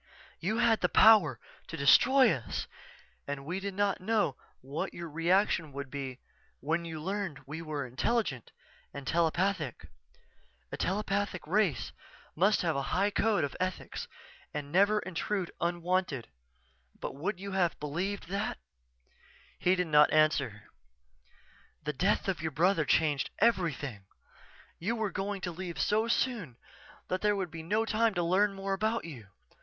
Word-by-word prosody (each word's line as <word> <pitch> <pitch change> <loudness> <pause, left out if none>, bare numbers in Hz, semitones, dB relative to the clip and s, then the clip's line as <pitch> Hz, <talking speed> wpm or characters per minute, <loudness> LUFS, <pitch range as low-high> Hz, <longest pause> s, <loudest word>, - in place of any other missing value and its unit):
You 215 +6 -1
had 235 -2 +3
the - - +2
power 185 - +6 0.3
to 165 - -6
destroy 255 - +6
us 120 -4 -4 0.6
and 140 -1 -4
we 180 +5 -3
did 195 0 -5
not 200 -1 +1
know 205 -8 +1 0.3
what 140 +4 -4
your 170 -1 -6
reaction 165 0 +1
would 140 -1 -6
be 135 -3 -5 0.4
when 165 +4 -1
you 160 -2 -6
learned 190 -4 -3
we 150 +4 -6
were 150 -4 -4
intelligent 130 - -1 0.4
and 140 -1 -7
telepathic. 170 - 0 0.9
A - - -3
telepathic 200 -1 -1
race 175 - +1 0.4
must 195 +6 +3
have 165 -3 +1
a 140 - 0 0.2
high 200 +2 +2
code 205 -5 +2
of 140 - -3
ethics 185 0 -3 0.5
and 145 -1 -4
never 205 +4 +4
intrude 185 +1 -3
unwanted 175 -5 -1 0.7
but - - -4
would 180 +8 -3
you 200 +1 -6
have 185 -3 +1
believed 175 +8 -3
that?_" 200 +1 -2 1.0
He 180 +1 +3
did 180 -1 0
not 150 -2 +5
answer. 155 -9 +2 1.2
"_The 150 -1 -2
death 195 +9 +1
of 185 -4 -1
your 160 - -1
brother 165 +2 +2
changed 145 -1 +2
everything. 150 - 0 0.7
You 215 +8 -1
were 220 -3 -1
going 195 +1 -3
to 180 - -3
leave 170 -3 -6
so 215 +8 +2
soon 230 - -1 0.5
that 185 0 -2
there 210 0 +3
would 190 -4 -3
be 165 - -7
no 210 +7 0
time 225 -1 +1
to 175 - +1
learn 195 +4 +2
more 195 0 -2
about 220 +2 0
you. 130 -11 -9
180 Hz, 150 wpm, -30 LUFS, 150-200 Hz, 1.2 s, power